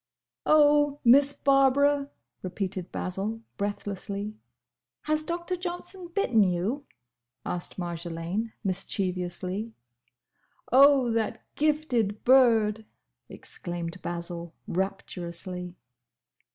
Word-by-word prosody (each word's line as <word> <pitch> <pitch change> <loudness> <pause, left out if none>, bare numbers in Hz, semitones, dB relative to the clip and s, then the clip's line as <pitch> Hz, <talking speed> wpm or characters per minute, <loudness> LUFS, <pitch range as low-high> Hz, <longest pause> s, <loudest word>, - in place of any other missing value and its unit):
"Oh, 290 -1 +5
Miss 275 +4 +7
Barbara!" 280 +1 +3 0.3
repeated 185 -1 -4
Basil, 200 +5 -3 0.2
breathlessly. 200 0 -4 0.7
"Has 310 0 0
Doctor 345 +3 -3
Johnson 355 +1 -6
bitten 335 - +2
you?" 200 +9 0 0.6
asked 175 -1 -3
Marjolaine, 170 +4 -4
mischievously. 185 +1 -2 1.0
"Oh, 270 -2 +6
that 225 0 -1
gifted 275 -9 0
bird!" 225 -4 +4 0.5
exclaimed 175 +1 -6
Basil, 170 -1 -5
rapturously. 180 -1 -4
215 Hz, 75 wpm, -27 LUFS, 180-280 Hz, 1.0 s, Miss